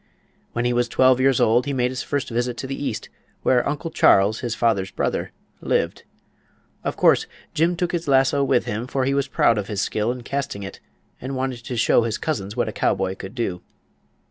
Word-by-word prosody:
When 120 +1 -1
he 120 - +2
was 120 0 +1
twelve 130 +1 +4
years 130 -1 +3
old 120 +5 +3
he 140 - -1
made 125 -1 +1
his 130 -1 -4
first 145 -2 -2
visit 120 +1 -1
to - - -5
the 135 +1 -4
east, 115 - -3 0.4
where 125 +1 +3
Uncle 150 +3 -4
Charles, 100 +3 +4
his 120 -2 -3
father's 110 -5 +1
brother, - - -2 0.3
lived. - - -1 0.8
Of - - -3
course - - +4 0.3
Jim 170 +3 +2
took 175 0 -1
his 170 -2 -3
lasso 135 +1 +3
with 125 -2 +2
him, 110 +4 -3
for 130 -1 -1
he 135 - +1
was 140 0 0
proud 115 -2 +3
of 100 - -4
his 100 -3 -2
skill 110 +2 0
in 125 -1 -6
casting 135 -7 -3
it, 95 - -8 0.4
and 135 +2 -4
wanted 130 -1 -2
to 125 - -4
show 115 - +4
his 115 -1 -1
cousins 105 -11 -3
what - - +1
a - - -2
cowboy 95 0 0
could 95 +5 -9
do. 95 -8 -2
125 Hz, 210 wpm, -23 LUFS, 110-135 Hz, 0.8 s, twelve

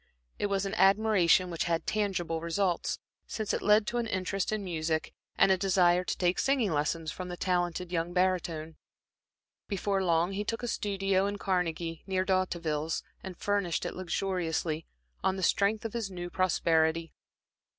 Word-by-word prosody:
It 205 - +1
was 200 -1 0
an 195 - -3
admiration 195 -3 +4
which 165 - -1
had 165 -1 0
tangible 175 -6 -1
results, 175 +1 0 0.3
since 215 -2 -2
it - - -1
led 210 +1 +4
to 240 +2 -1
an 235 - -1
interest 190 0 -1
in 215 -1 -2
music, 160 -3 -2 0.2
and 195 - +5
a 190 - +3
desire 180 -2 +3
to - - -3
take 180 0 +1
singing 265 -8 +2
lessons 155 +1 -1
from 185 - -6
the 175 0 -6
talented 175 -1 -1
young 170 0 -1
barytone. 175 -3 0 0.9
Before 195 -1 0
long, 170 +1 +2
he 200 +1 -2
took 230 +3 -3
a - - -1
studio 195 -3 0
in 205 0 -3
Carnegie, 170 -4 -1
near 190 -1 0
D'Hauteville's, 170 -5 0 0.2
and 185 -2 -8
furnished 200 -4 0
it - - -3
luxuriously, 170 -3 -2 0.4
on 190 - +2
the 190 - -4
strength 205 +5 +2
of 225 - -4
his 230 -4 -2
new 175 -2 -6
prosperity. 165 -3 +1
185 Hz, 165 wpm, -30 LUFS, 170-200 Hz, 0.9 s, and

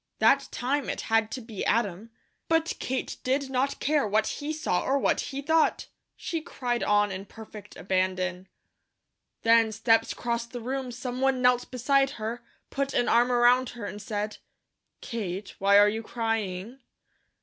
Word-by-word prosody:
That 275 +6 +4
time 275 +3 -1
it - - -3
had 225 -1 +1
to 255 - -5
be 220 -4 -6
Adam, 210 -1 0 0.4
but 325 0 +2
Kate 260 0 -3
did 265 +1 0
not 270 +2 0
care 295 -5 +1
what 215 +2 +2
he 290 +1 -3
saw 310 -13 -1
or 275 - +1
what - - +1
he 275 0 -4
thought. 320 +2 +2 0.3
She 330 -2 -4
cried 245 -6 -3
on 205 0 +2
in 190 +1 -6
perfect 210 -1 -12
abandon. 185 0 -1 1.0
Then 230 -1 +5
steps 225 +1 +2
crossed 235 0 -3
the 245 - -4
room, 255 +2 -3
someone 255 +2 -1
knelt 250 0 +3
beside 270 +2 +2
her, 230 +2 -4 0.3
put 275 0 -2
an 245 - +2
arm 240 +2 +4
around 245 +1 +4
her 220 - -5
and 205 +1 -6
said: 210 0 -3 0.6
"Kate, 200 -4 -5
why 200 +1 +5
are 205 0 +7
you 220 +2 -1
crying?" 225 0 -3
235 Hz, 160 wpm, -27 LUFS, 210-265 Hz, 1.0 s, are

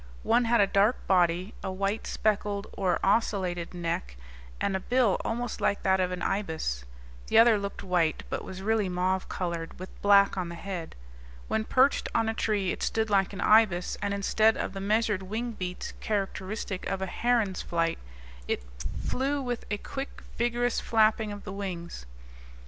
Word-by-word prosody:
One 240 +1 +3
had 235 +1 +3
a 200 - +6
dark 200 +4 +2
body, 180 +2 +2
a 190 - -2
white 195 +3 -2
speckled 205 -1 0
or 185 -3 0
ocellated 190 -5 +1
neck, 165 - -3 0.4
and 195 - 0
a - - 0
bill 245 -1 +2
almost 235 0 -3
like 200 - +1
that 190 0 +3
of 180 -1 +1
an 180 -1 -4
ibis. 160 - -2 0.4
The - - +3
other 225 -2 +7
looked 200 0 -5
white, 175 -4 +1
but - - -3
was 190 0 -8
really 215 -2 +1
mauve 185 +1 0
colored, 170 -2 -4
with 185 - -7
black 200 -1 +5
on 175 -2 -3
the 170 - -6
head. 175 -2 -6 0.5
When 220 0 0
perched 260 +4 +3
on 225 -1 +2
a 225 - 0
tree 205 -5 0
it - - -5
stood 220 -1 0
like 195 -2 +3
an 200 -1 -6
ibis; 210 -5 +4
and 205 -1 -1
instead 215 +2 +3
of - - -3
the 195 - -5
measured 210 -1 +1
wing 220 +5 -3
beats 180 -4 -5
characteristic 195 -1 -3
of 190 0 -2
a - - 0
heron's 220 -1 0
flight, 165 -1 -1 0.5
it - - -1 0.4
flew 275 +2 0
with 245 -3 -3
a 210 - -1
quick, 270 +6 -7
vigorous 240 0 +1
flapping 220 -1 +2
of 205 0 -7
the 200 - -6
wings. 175 - -6
200 Hz, 175 wpm, -28 LUFS, 185-220 Hz, 0.5 s, other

